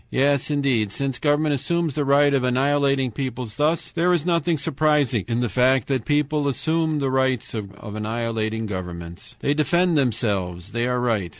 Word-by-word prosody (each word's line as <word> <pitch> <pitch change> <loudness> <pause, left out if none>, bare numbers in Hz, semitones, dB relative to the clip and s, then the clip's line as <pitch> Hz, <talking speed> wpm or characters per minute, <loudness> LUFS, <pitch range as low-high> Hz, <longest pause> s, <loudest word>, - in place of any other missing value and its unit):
"Yes, 140 +1 +1
indeed, 135 -8 +1
since 135 +2 -3
government 150 0 +2
assumes 165 +3 -1
the 145 +1 -1
right 140 +1 +4
of 135 -2 +2
annihilating 135 0 +1
peoples 125 -2 -5
thus, 155 +3 0
there 175 +1 +1
is 170 -3 +1
nothing 170 -2 +1
surprising 140 -5 +1
in 115 +1 -1
the 120 - +1
fact 130 +1 +2
that 135 -2 +1
the 110 - -16
peoples 150 0 +1
assume 160 +4 0
the 135 -2 -1
right 130 -2 0
of 105 -1 -7
annihilating 110 0 -2
governments. 85 -4 -7
"They 140 - +1
defend 165 +3 +2
themselves. 100 -7 -1
They 120 +1 -1
are 125 0 0
right. 110 -7 0
130 Hz, 175 wpm, -23 LUFS, 115-145 Hz, -, right